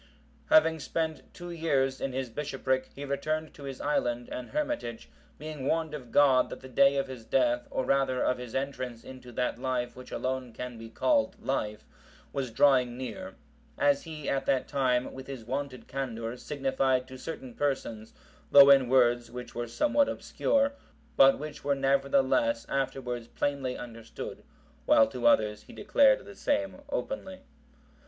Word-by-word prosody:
] - - -32
Having 165 - +5
spent 160 +1 -3
two 175 0 -8
years 140 -6 0
in 135 - -1
his 130 0 -3
bishopric, 130 -1 -2
he 140 - -6
returned 155 +3 -2
to 140 - -11
his 135 -1 -6
island 120 -4 -1
and 125 - -5
hermitage,(756) 120 - -5
being 150 -3 -6
warned 160 -1 0
of 130 -6 -8
God 135 -3 +5
that - - -8
the 130 - -10
day 140 +2 +4
of 135 - +1
his 130 -3 -9
death, 120 0 +1
or 130 - -2
rather 135 -1 +2
of 125 0 +1
his 125 -2 -8
entrance 130 -3 -3
into 130 -1 -11
that 125 -1 -1
life 125 -2 -2
which 125 0 -11
alone 130 -2 -3
can 125 -1 -7
be 115 0 -9
called 285 - +1
life, 105 -6 -2 0.5
was 135 -3 -2
drawing 125 0 +3
near; 185 +9 -6 0.4
as 145 -1 +3
he, 155 -3 -8
at 135 - -1
that 130 -2 +1
time, 130 -3 0
with 130 0 -9
his 130 -5 -7
wonted 135 +1 -4
candour, 115 -4 -4
signified 130 -1 0
to 130 - -10
certain 130 -2 -7
persons, 115 -6 -2 0.4
though 140 0 +9
in 135 -3 +5
words 120 -2 +3
which 125 +1 -8
were 120 0 -3
somewhat 285 - +2
obscure, 280 0 0 0.4
but 135 0 +7
which 150 0 -8
were 140 0 +1
nevertheless 140 - +2
afterwards 125 -3 -2
plainly 135 -2 -2
understood; 115 -2 -8 0.5
while 110 - +7
to 120 +1 -1
others 105 -2 +3
he - - -15
declared 265 +5 +3
the 200 - -10
same 290 +6 -1
openly. 285 - -4
135 Hz, 165 wpm, -29 LUFS, 125-145 Hz, 0.5 s, though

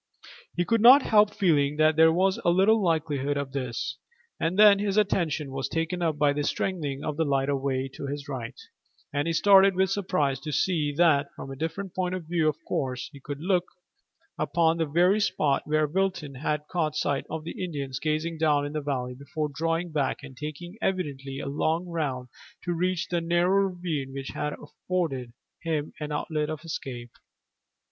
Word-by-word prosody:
He 175 - +1
could 230 +1 +2
not 260 +4 +9
help 210 -1 +4
feeling 150 -7 +2
that 155 0 +4
there 160 0 +6
was 185 +3 +2
little 195 +6 +4
likelihood 150 -5 0
of 140 -1 -3
this, 130 -1 -4 0.4
and 170 +3 -1
then 205 -1 +8
his 200 0 -1
attention 160 -8 +1
was 135 0 -3
taken 165 +2 -2
up 160 -3 0
by 145 -1 +3
the 145 - -2
strengthening 145 -5 -2
of 150 -1 -3
the 165 - +2
light 140 -2 0
away 135 -1 -1
to 140 - -6
his 140 0 -5
right, 125 -5 -6 0.5
and 145 +2 0
he - - +1
started 195 +2 +6
with 190 +1 +2
surprise 165 -9 0
to 150 +2 -6
see 150 0 +1
that, 155 -5 +4
from 135 - -8
a - - -6
different 165 +6 -4
point 185 -1 -1
of 180 -3 -6
view 165 -1 +1
of 150 - -3
course, 130 -2 -2
he 140 - -11
could 140 +1 -7
look 180 0 +1 0.7
upon 165 -1 +2
the 165 -1 0
very 175 +7 +3
spot 145 -8 +1
where 155 0 +2
Wilton 175 -3 -1
had 150 +2 -2
caught 155 -4 -1
sight 145 -2 -1
of 160 0 -4
the 170 +3 -6
Indians 140 -6 -4
gazing 155 +2 -2
down 150 -2 +2
into 150 +1 -3
the - - -8
valley 125 -3 -2
before 140 +3 -4
drawing 165 +3 -1
back 145 -2 -1
and 135 -2 -10
taking 155 +7 -7
evidently 140 -8 -2
a 140 - -5
long 160 +5 0
round 145 -8 -3 0.4
to 175 - -1
reach 180 +1 -1
the 175 -1 0
narrow 175 +4 +2
ravine 165 -7 -4
which 135 0 -5
had 150 0 -3
afforded 150 -4 -3 0.3
him 155 -3 -2
an 150 -1 -5
outlet 150 0 -2
of 155 0 -5
escape. 120 -7 -6
155 Hz, 185 wpm, -27 LUFS, 140-175 Hz, 0.7 s, not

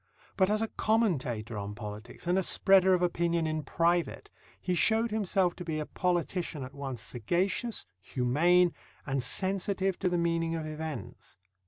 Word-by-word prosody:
But 190 -1 +3
as 215 +1 +1
a - - 0
commentator 130 - 0
on 100 +1 -5
politics 105 +5 -8
and 175 +1 +2
a - - +2
spreader 190 0 +4
of 180 - 0
opinion 170 -1 +1
in 155 0 -1
private, 170 +4 0 0.3
he 180 - -1
showed 225 +5 +2
himself 195 -4 +1
to 180 - -6
be 160 -3 -3
a 150 - -3
politician 175 -4 -1
at 130 +1 -8
once 135 -4 -5
sagacious, 180 - -1
humane, 165 - +3 0.3
and 135 -1 -1
sensitive 190 - 0
to 185 - +1
the 175 - 0
meaning 165 -1 0
of 160 -1 -3
events. 155 - -7
170 Hz, 160 wpm, -30 LUFS, 140-185 Hz, 0.3 s, spreader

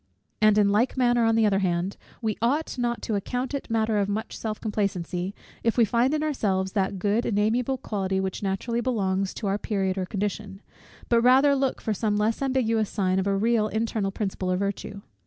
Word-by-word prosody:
And 215 -1 +5
in 205 -1 +4
like 225 +6 +1
manner, 240 -2 +3
on 225 0 +3
the 225 -1 +4
other 195 -2 +3
hand, 180 0 -1 0.3
we 220 -1 0
ought 285 +7 0
not 240 -1 -1
to 220 - -2
account 245 +6 -2
it 280 - -4
matter 220 -1 +1
of 200 0 0
much 215 +2 -3
self 215 -1 -4
complacency, 195 -3 -2 0.3
if 230 +1 +1
we 235 - +6
find 235 +5 +2
in 305 - -1
ourselves 195 -11 0
that 195 -1 -1
good 205 +5 +1
and 205 - -1
amiable 235 +5 +1
quality 195 -6 -2
which 190 -1 -3
naturally 210 +4 -1
belongs 195 -6 0
to - - -5
our 200 +1 0
period 195 -3 -1
or 185 - -2
condition; 200 0 -4 0.4
but 235 -1 +3
rather 265 +4 +5
look 270 -1 0
for 220 - -1
some 210 0 0
less 215 +4 0
ambiguous 230 -5 +1
sign 190 -2 0
of 190 - -1
a 195 0 +1
real 220 +1 +2
internal 220 -2 -1
principle 195 -2 -3
of 180 - +1
virtue. 200 +1 -4
210 Hz, 205 wpm, -26 LUFS, 195-235 Hz, 0.4 s, we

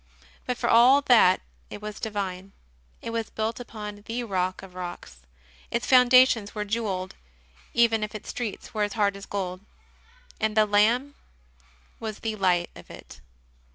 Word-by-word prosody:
But 250 -1 -1
for - - -1
all 250 +5 +6
that 225 -9 +5 0.3
it - - -8
was 210 0 -7
divine; 195 -3 -4 0.5
it 230 - -4
was 230 -1 -3
built 220 +2 -3
upon 210 -3 -8
the 240 +1 -3
Rock 185 -4 -2
of 190 -2 -12
rocks; 175 - -8 0.5
its 235 +1 -2
foundations 250 -4 +5
were 210 -1 -2
jewelled 200 -4 -3 0.6
even 230 -2 +3
if 210 +1 -5
its 215 - -8
streets 230 -5 -5
were 215 - -2
as 205 -1 0
hard 205 -3 +1
as 200 - -10
gold; 185 -2 -4 0.8
and 220 0 -1
the 215 - +6
Lamb 225 +7 +2 0.9
was 215 -2 -5
the 220 -1 -3
light 180 -3 +1
of - - -14
it. - - -13
215 Hz, 155 wpm, -26 LUFS, 195-230 Hz, 0.9 s, all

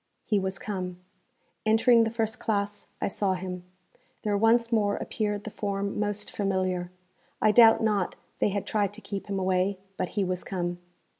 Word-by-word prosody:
He 210 -3 +2
was 190 0 -2
come. 185 -4 -4 0.7
Entering 230 +1 +5
the - - 0
first 220 -1 -2
classe, 205 -1 -2
I - - 0
saw 195 -1 +1
him. 180 -1 -5 0.6
There 210 -1 +1
once 230 +3 +3
more 205 -3 +2
appeared 210 -2 -2
the 220 - -6
form 200 -1 -2
most 210 0 -1
familiar. 185 -3 0 0.5
I 215 - +4
doubt 225 0 +7
not 205 -4 +1 0.2
they - - +3
had 200 -1 -2
tried 205 -2 0
to 220 - -10
keep 200 -2 -5
him 200 -1 -2
away, 190 +1 +1 0.2
but 185 - -1
he 200 - +3
was 180 -1 -2
come. 175 -2 -3
200 Hz, 170 wpm, -28 LUFS, 190-215 Hz, 0.7 s, doubt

